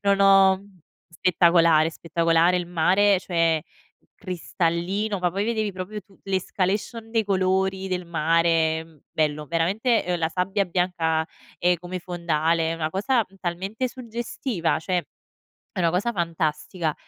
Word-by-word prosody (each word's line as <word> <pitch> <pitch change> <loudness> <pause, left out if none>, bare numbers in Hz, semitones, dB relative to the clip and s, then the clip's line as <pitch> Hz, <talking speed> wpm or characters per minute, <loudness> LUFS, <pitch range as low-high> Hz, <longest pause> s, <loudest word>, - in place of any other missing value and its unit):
non 200 0 +2
ho 195 -1 +6 0.5
spettacolare 170 -2 +4
spettacolare. 165 +2 +2
Il 175 -1 -2
mare 185 +3 +3
cioè 165 -3 +1 0.6
cristallino, 185 +2 -2
ma 180 -1 +1
poi 195 +4 -2
vedevi 220 -2 -1
proprio 185 +3 -6
tu 195 0 -25
l'escalation 195 +4 -2
dei 225 -2 +2
colori 190 0 0
del 180 -1 -2
mare 160 -1 +1
bello 150 -1 -1
veramente, 195 - +1
ehm, 180 -1 -1
la 160 -1 0
sabbia 190 +4 0
bianca, 170 -3 0 0.3
ehm, 180 0 +3
come 180 +2 -6
fondale 165 -2 0
è - - -2
una 160 -1 -2
cosa, 230 +6 +1
mhmm, 195 - -21
talmente 195 +8 -3
suggestiva, 235 - -3
cioè 180 +1 -1 0.7
è - - 0
una 170 -1 +3
cosa 185 +7 0
fantastica. 165 -2 -2
180 Hz, 135 wpm, -24 LUFS, 165-195 Hz, 0.7 s, ho